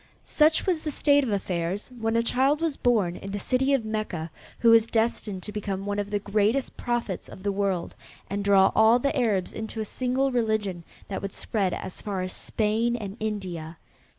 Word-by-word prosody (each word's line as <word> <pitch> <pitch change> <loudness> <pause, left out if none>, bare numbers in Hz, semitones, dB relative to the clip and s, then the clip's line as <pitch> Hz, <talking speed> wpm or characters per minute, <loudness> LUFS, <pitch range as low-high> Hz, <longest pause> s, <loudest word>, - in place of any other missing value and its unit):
Such 310 +1 +3
was 360 -4 +1
the 310 - -3
state 285 0 +3
of 255 - -2
affairs 185 0 -2
when 225 0 0
a 230 - +3
child 270 +5 +2
was 325 -3 0
born 210 -10 +1
in 195 - -8
the 205 - -2
city 255 +7 +1
of 270 -5 +2
Mecca 215 -7 -3 0.3
who 230 - +5
was 230 0 +6
destined 220 -4 -1
to 210 - -6
become 200 -2 -4
one 205 0 -1
of 205 0 -3
the 205 - 0
greatest 210 +6 0
prophets 240 -6 -3
of 190 - -11
the 200 - +1
world, 195 -3 -1 0.3
and 200 +1 -3
draw 195 -1 +5
all 220 +2 +6
the 280 +4 0
Arabs 215 -8 +1
into 220 0 -5
a 215 - -1
single 255 +4 0
religion 215 -7 0 0.2
that 195 - -4
would 195 -1 -5
spread 195 -4 -1
as 185 - -5
far 195 -3 -3
as 185 - -4
Spain 225 +2 0
and 205 -4 -5
India. 180 -7 -4
215 Hz, 200 wpm, -26 LUFS, 195-240 Hz, 0.3 s, was